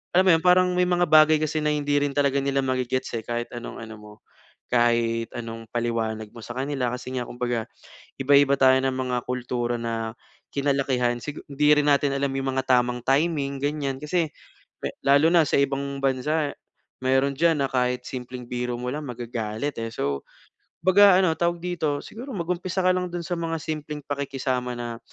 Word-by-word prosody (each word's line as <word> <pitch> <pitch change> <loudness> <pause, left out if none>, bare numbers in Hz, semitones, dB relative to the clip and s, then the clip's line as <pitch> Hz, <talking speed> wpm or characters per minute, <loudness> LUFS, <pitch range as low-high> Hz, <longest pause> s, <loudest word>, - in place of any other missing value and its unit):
alam 185 +1 +5
mo 185 - +6
yun 165 - +3
parang 180 +1 +5
may 180 0 +2
mga 175 0 +2
bagay 155 -1 +6
kasi 155 0 -1
na 150 - +1
hindi 145 -1 +1
rin 145 -1 -1
talaga 140 -1 +2
nila 135 0 0
ma-ge-gets, 130 0 -1
eh, 115 - -2
kahit 120 0 -3
anong 120 0 -7
ano 110 0 -9
mo, 105 0 -13 0.6
kahit 115 -1 +2
anong 115 -1 -7
paliwanag 110 -2 -2
mo 120 - -11
sakanila. 130 +2 -2
Kasi 130 +1 -8
nga 120 - -4
kumbaga 120 -2 -2 0.5
iba-iba 140 0 +5
tayo 130 -1 +6
ng 135 - +1 0.2
mga 125 -1 0
kultura 120 -1 -2
na 115 -1 -3 0.4
kinalakihan 135 -4 0
sigu 150 +3 -7
hindi 150 +1 +3
rin 150 - +2
natin 145 0 +3
alam 140 0 -1
yung 135 0 -1
mga 130 - +1
tamang 125 -1 +3
timing 140 -1 +1
ganyan. 145 -2 -2
Kasi 165 +2 +1 0.8
lalo 140 +2 +5
na 170 - +7
sa 150 - +1
ibang 140 0 -1
bansa 145 +3 0 0.5
meron 135 +2 +2
diyan 160 -1 +2
na - - +3
kahit 125 -1 0
simpleng 125 -1 -7
biro 125 0 -3
mo 125 +1 -3
lang 150 - -4
magagalit, 120 +2 -4
eh. 115 - -3
So, 70 -10 -2 0.6
kumbaga 190 0 +6
ano 165 -4 +2
tawag 170 0 0
dito, 160 -5 -1
siguro 250 +4 -8
mag-umpisa 180 +1 -2
ka 185 - +4
lang 180 0 -1
dun 175 - -3
sa 170 +1 -3
mga 165 -1 -2
simpleng 150 -1 -5
pakikisama 135 -3 -2
na 120 -1 -5
135 Hz, 180 wpm, -25 LUFS, 125-155 Hz, 0.8 s, na